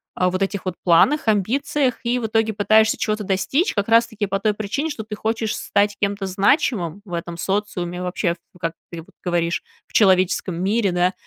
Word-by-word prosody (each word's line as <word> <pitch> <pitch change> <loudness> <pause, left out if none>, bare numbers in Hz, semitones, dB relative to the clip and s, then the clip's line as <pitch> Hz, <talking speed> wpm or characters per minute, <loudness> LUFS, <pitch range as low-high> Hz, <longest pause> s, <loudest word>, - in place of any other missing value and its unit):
а, 180 0 +2
вот 185 +1 -3
этих 195 0 -2
вот 185 - -1
планах, 225 - +4
амбициях, 250 +6 +1
и 240 +1 +1
в 240 - -3
итоге 220 0 +1
пытаешься 215 +2 +3
чего-то 215 -1 -1
достичь 235 - 0
как 205 0 0
раз-таки 230 -2 +2
по 195 0 -2
той 210 +1 +1
причине, 220 +10 -2
что 290 -8 -5
ты 215 0 -7
хочешь 220 0 -2
стать 205 0 0
кем-то 200 -1 -1
значимым 195 - +1
в 175 - -10
этом 170 0 -4
социуме 180 -2 -2
вообще, 180 -1 -1 0.2
в, - - -17
как 165 -1 -2 0.2
ты 170 - -6
вот 160 - -19
говоришь, 170 -1 0 0.3
в - - -26
человеческом 185 -3 +3
мире, 200 0 +1
да, 180 +1 +1
200 Hz, 190 wpm, -21 LUFS, 180-220 Hz, 0.3 s, планах